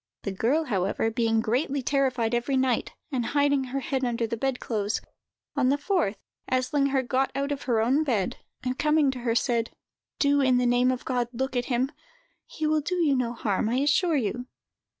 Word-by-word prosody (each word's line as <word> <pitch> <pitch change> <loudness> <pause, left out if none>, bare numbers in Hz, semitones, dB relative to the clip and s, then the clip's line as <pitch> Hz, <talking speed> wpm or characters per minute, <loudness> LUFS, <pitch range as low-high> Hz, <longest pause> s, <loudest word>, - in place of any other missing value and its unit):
The 200 - -2
girl, 245 +11 +1
however, 205 - 0
being 225 -1 +1
greatly 265 +5 0
terrified 255 -4 +1
every 240 +3 +1
night, 260 -3 +1 0.2
and 255 -3 0
hiding 285 +1 +2
her 270 +2 -3
head 265 0 -2
under 235 -1 0
the 230 - -3
bed 265 +2 -1
clothes, 210 -2 -1 0.6
on 265 -3 +2
the 280 - +3
fourth 290 - 0 0.3
Eslinger 270 +1 +1
got 265 +1 +1
out 280 +1 -1
of 285 - -2
her 235 -4 +2
own 265 +7 +2
bed, 225 -10 -1 0.3
and, 255 0 -2
coming 300 -2 +3
to 260 - -7
her, 235 -1 0
said: 235 -1 +1 0.5
"Do, 285 0 +3
in 260 -2 +4
the 250 - +2
name 245 +1 +3
of 255 - -4
God, 245 -2 0
look 260 +2 -3
at 245 0 0
him! 260 +1 0 0.6
He 310 - -4
will 305 0 +2
do 355 +5 -2
you 320 -6 +2
no 245 -2 0
harm, 215 -2 -1
I 240 - 0
assure 295 +5 +2
you." 245 +1 -2
255 Hz, 195 wpm, -26 LUFS, 235-280 Hz, 0.6 s, in